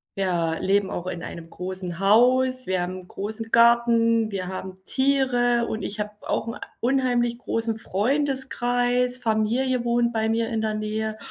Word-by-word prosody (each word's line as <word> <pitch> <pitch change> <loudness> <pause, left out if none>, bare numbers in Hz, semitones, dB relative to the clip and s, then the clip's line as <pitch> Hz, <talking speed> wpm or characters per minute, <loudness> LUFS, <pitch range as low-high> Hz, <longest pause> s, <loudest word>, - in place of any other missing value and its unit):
Wir 175 -4 0
leben 195 0 +2
auch 175 +1 -4
in 175 -2 -5
einem 165 -1 -8
großen 180 -1 -4
Haus, 255 +5 +3
wir 185 -1 0
haben 185 +1 -4
'n - - -19
großen 220 +4 -5
Garten, 230 -1 +4
wir 190 -2 -3
haben 185 0 -7
Tiere 255 -3 +2
und 220 -2 -4
ich 205 - -5
habe 210 0 -4 0.2
auch 220 - -1
'n 230 - -6 0.2
unheimlich 245 -2 +1
großen 230 -2 -2
Freundeskreis. 250 +1 0
Familie 240 +2 0
wohnt 235 0 +2
bei 220 -1 0
mir 225 0 0
in 225 - -1
der 220 -1 -1
Nähe 215 0 -3
225 Hz, 160 wpm, -24 LUFS, 195-245 Hz, 0.2 s, Garten